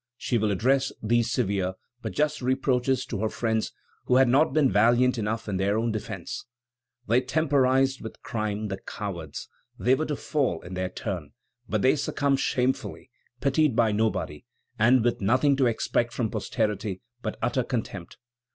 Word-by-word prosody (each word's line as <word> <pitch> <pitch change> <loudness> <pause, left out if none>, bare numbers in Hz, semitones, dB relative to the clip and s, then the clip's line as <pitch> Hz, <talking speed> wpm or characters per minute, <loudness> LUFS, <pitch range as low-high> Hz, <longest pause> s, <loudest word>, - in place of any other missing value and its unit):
She 120 - 0
will 110 0 +1
address 130 +7 +2
these 115 +1 +2
severe 100 -7 0 0.3
but - - -5
just 150 -1 0
reproaches 130 0 +1
to 105 - -4
her 110 +1 0
friends 110 -1 -1 0.3
who 125 - +3
had 130 0 +6
not 140 +6 +4
been 145 -3 +3
valiant 120 +4 +4
enough 110 +1 -2
in 100 -2 -1
their 100 +2 +1
own 115 +1 0
defence: 110 -1 -5 0.6
"They 120 +4 +4
temporized 135 -2 +2
with 110 - -8
crime, 110 -1 -2
the 95 0 -4
cowards! 85 -10 -6 0.3
They 125 - +3
were 155 +4 0
to 150 - -1
fall 135 - -1
in 90 - -8
their 90 0 -2
turn, 90 -7 -5 0.4
but 105 -2 0
they 130 - +5
succumb 140 0 0
shamefully, 130 0 -1 0.3
pitied 140 -1 +2
by 115 -2 +3
nobody, 105 -8 -1 0.4
and 120 +2 +5
with 120 -2 0
nothing 130 +8 +3
to 135 -2 +3
expect 120 +1 0
from 115 -4 -1
posterity 105 -3 -2 0.2
but 110 - -4
utter 125 +2 +1
contempt.... 105 -8 -5
120 Hz, 165 wpm, -26 LUFS, 105-130 Hz, 0.6 s, had